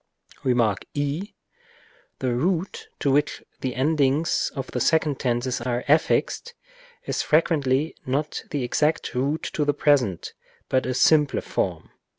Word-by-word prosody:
Rem. 125 -2 +2
i. 110 -3 +3 1.4
The 130 -2 -1
root 170 +8 -1
to 140 - +2
which 145 +2 +1 0.2
the 130 -2 -3
endings 145 +2 +1
of 135 - -3
the 125 - -2
second 155 0 +2
tenses 125 0 -1
are 120 0 -2
affixed 160 - +1 0.5
is - - -1
frequently 150 -2 +1
not 145 +4 -2
the 145 -3 -2
exact 150 +5 0
root 140 +5 -1
of 150 - +2
the 145 - +2
present, 125 - +1 0.4
but 130 -2 +1
a 130 - -1
simpler 150 +1 +4
form. - - -3
140 Hz, 135 wpm, -24 LUFS, 125-155 Hz, 1.4 s, simpler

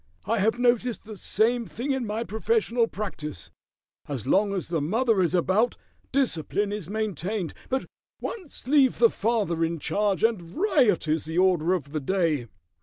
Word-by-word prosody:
"I 225 +2 0
have 220 +4 +2
noticed 245 -1 +1
the 215 0 -8
same 230 +4 +1
thing 265 +5 -3
in 265 -4 -1
my 215 +2 -2
professional 235 - +1
practice. 155 - -5 0.6
As 135 -7 -4
long 200 +1 +3
as 190 -3 -2
the 165 -3 0
mother 220 - +2
is 175 0 +2
about 190 +7 +2 0.3
discipline 205 - +1
is 200 -5 -5
maintained, 205 -3 -2 0.2
but 265 0 -1 0.3
once 365 - -7
leave 270 -2 +4
the 230 -1 +5
father 205 -7 0
in 165 +1 -1
charge 200 +6 0
and 190 -7 0
riot 270 - +2
is 155 0 0
the 160 +2 -4
order 180 -2 +3
of 145 -5 -6
the 155 - -1
day." 155 -5 0
210 Hz, 165 wpm, -26 LUFS, 170-235 Hz, 0.6 s, the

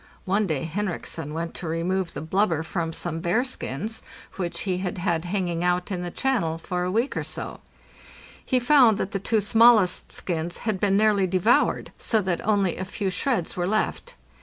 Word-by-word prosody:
One 200 +2 +1
day 155 -6 -1
Henriksen 165 -3 -3
went 165 +2 -4
to 175 - -6
remove 175 +3 -1
the - - -4
blubber 165 -1 +1
from 165 0 -3
some 165 0 -4
_ - - -8
bearskins, 220 - -1 0.3
which 175 -3 -3
he 185 -3 -1
had 185 -1 -3
had 175 -2 -1
hanging 175 -2 -1
out 180 +2 0
in 180 -2 -2
the 175 - -3
channel 200 -8 0
for 180 +2 -3
a 180 - -1
week 230 +7 0
or - - -1
so; - - -5 0.8
he 255 - +2
found 245 -4 +5
that 190 - -3
the 195 - -2
two 215 +2 +1
smallest 220 -3 +4
skins 170 -1 -3
had 215 -4 0
been 195 0 +2
nearly 205 -3 +3
devoured, 185 +6 +2
so 225 - +1
that 180 -2 -1
only 200 -4 +1
a - - -3
few 195 0 -3
shreds 215 -5 -1
were 175 -1 -1
left. 215 +2 -1
185 Hz, 185 wpm, -25 LUFS, 170-210 Hz, 0.8 s, found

